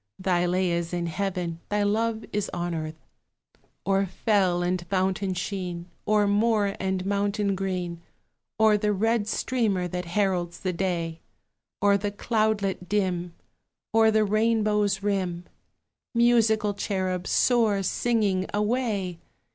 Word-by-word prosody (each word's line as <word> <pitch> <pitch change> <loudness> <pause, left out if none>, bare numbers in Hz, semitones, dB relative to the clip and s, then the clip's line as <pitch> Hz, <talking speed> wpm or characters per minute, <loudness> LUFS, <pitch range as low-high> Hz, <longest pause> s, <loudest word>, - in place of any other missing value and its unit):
Thy 180 -2 +1
lay 180 0 +1
is 170 0 -2
in 175 -1 -1
heaven, 175 -1 -3
thy 205 0 +1
love 220 +2 0
is 210 -1 -1
on 175 0 -2
earth. 155 -1 -6 0.8
O'er 195 0 +2
fell 185 -3 +1
and 180 0 -1
fountain 190 0 0
sheen, 180 -2 -4 0.2
O'er 210 -1 +4
moor 205 0 +2
and 190 -1 -1
mountain 200 0 0
green, 180 -3 -3 0.6
O'er 220 -1 +5
the 210 0 +1
red 220 +1 +1
streamer 215 -6 0
that 180 +1 -4
heralds 175 -1 -1
the 185 -1 -1
day, 170 -3 -2 0.6
Over 200 0 +4
the 205 +1 -1
cloudlet 205 -4 -1
dim, 180 -4 -1 0.6
Over 225 0 +5
the 215 0 +3
rainbow's 210 -2 +1
rim, 185 -4 -1 0.7
Musical 220 -3 +3
cherub, 185 -3 -2
soar, 225 -5 +3
singing, 200 -2 +1
away! 210 -5 -1
195 Hz, 125 wpm, -26 LUFS, 180-210 Hz, 0.8 s, O'er